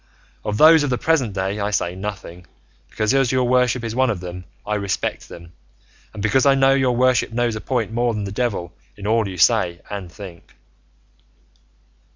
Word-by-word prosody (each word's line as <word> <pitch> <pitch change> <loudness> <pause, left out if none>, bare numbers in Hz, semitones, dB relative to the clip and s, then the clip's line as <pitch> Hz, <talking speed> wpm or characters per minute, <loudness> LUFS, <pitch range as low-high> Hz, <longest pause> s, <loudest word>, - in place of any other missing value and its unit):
Of 105 0 -2
those 160 +4 +7
of 145 - -1
the 125 - 0
present 135 -10 0
day 95 +2 -2
I 100 0 -1
say 90 -4 -1
nothing, 95 -3 -7 0.4
because, 110 +2 -1
as 135 -3 +2
your 130 -1 +1
worship 125 -1 +2
is 115 -1 -4
one 130 0 +2
of 105 -6 -2
them, 90 0 -8 0.2
I 105 - -2
respect 100 -2 -3
them, 85 0 -12 0.6
and 105 -2 -7
because 105 +5 +2
I 140 -1 +5
know 135 0 +4
your 130 -2 +1
worship 125 -1 +2
knows 120 -1 -1
a 110 - -5
point 120 -5 -2
more 120 -1 0
than 105 - -3
the 100 - -5
devil 100 -7 -3 0.2
in 100 - -9
all 110 0 +1
you 95 -1 -7
say 85 +1 +2
and 100 -4 -6
think." 90 -2 -12
110 Hz, 190 wpm, -21 LUFS, 95-125 Hz, 0.6 s, those